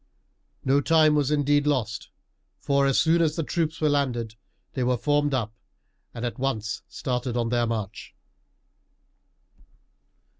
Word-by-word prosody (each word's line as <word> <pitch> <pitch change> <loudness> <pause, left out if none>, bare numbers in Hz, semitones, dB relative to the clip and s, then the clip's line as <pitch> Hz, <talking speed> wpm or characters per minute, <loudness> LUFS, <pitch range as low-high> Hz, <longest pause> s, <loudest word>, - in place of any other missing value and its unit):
No 135 +2 +3
time 155 0 +4
was 145 -2 +1
indeed 145 0 +2
lost, 115 -8 -1 0.5
for 140 -1 +2
as 135 - +2
soon 165 +1 +3
as 155 -2 +1
the 165 - -1
troops 160 0 -2
were 155 - +2
landed 125 -6 0 0.4
they 130 - -1
were 125 0 +1
formed 145 +3 +1
up 115 -5 -1 0.6
and 120 0 -5
at 120 +2 -4
once 110 -5 -2
started 125 -1 -3
on 115 -1 0
their 120 0 +1
march. 110 -3 -5
135 Hz, 140 wpm, -25 LUFS, 120-145 Hz, 0.6 s, time